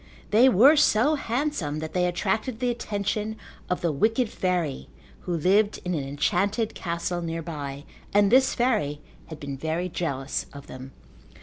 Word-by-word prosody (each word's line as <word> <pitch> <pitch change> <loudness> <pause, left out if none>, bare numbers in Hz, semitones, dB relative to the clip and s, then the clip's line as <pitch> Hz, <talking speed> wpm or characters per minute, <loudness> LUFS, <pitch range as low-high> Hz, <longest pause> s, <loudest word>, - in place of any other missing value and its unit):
They 235 +5 +6
were 260 +7 +7
so 290 -1 +4
handsome 245 - -2
that 155 0 -5
they 180 -1 +2
attracted 220 +6 -1
the 250 -1 +1
attention 210 -1 -2 0.3
of 180 - -1
the 170 - +1
wicked 220 - +1
fairy 175 -7 -2 0.4
who 175 - -1
lived 200 +6 +2
in 180 - -1
an 150 -4 -1
enchanted 200 +10 0
castle 170 0 -3
nearby, 155 -4 -5 0.3
and 205 0 +4
this 260 +1 +4
fairy 210 - 0 0.3
had 160 -2 -9
been 140 -1 -6
very 160 +4 -2
jealous 140 -6 -3
of 140 -1 -10
them. 130 +1 -10
180 Hz, 150 wpm, -26 LUFS, 155-220 Hz, 0.4 s, were